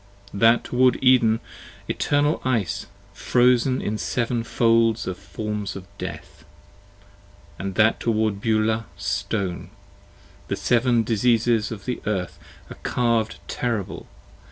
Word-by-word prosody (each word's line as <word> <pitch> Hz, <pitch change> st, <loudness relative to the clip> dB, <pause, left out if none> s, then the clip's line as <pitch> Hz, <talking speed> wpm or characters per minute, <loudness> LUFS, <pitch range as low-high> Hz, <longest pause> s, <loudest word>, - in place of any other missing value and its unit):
15 100 Hz, -, -6 dB
That 115 Hz, +2 st, +5 dB
toward 125 Hz, 0 st, +3 dB
Eden, 120 Hz, -4 st, +4 dB, 0.5 s
eternal 145 Hz, +1 st, +1 dB
ice, 115 Hz, -8 st, -1 dB, 0.3 s
frozen 125 Hz, +1 st, +2 dB
in 105 Hz, +1 st, -2 dB
seven 120 Hz, -1 st, -1 dB
folds 115 Hz, -1 st, +2 dB
Of 95 Hz, -, -3 dB
forms 105 Hz, +1 st, -5 dB
of 95 Hz, -1 st, -8 dB
death: -, -, -8 dB, 1.2 s
and 95 Hz, -1 st, -4 dB
that 110 Hz, 0 st, +3 dB
toward 110 Hz, -3 st, 0 dB
Beulah, 110 Hz, 0 st, +1 dB
stone: 95 Hz, -5 st, -3 dB, 0.8 s
The -, -, -1 dB
seven 120 Hz, -1 st, +2 dB
diseases 115 Hz, 0 st, +2 dB
of 105 Hz, -2 st, -7 dB
the 125 Hz, -, -3 dB
earth 95 Hz, -4 st, -2 dB, 0.3 s
are -, -, -9 dB
carved 115 Hz, -3 st, 0 dB
terrible. 115 Hz, -6 st, -3 dB
115 Hz, 115 wpm, -23 LUFS, 105-120 Hz, 1.2 s, That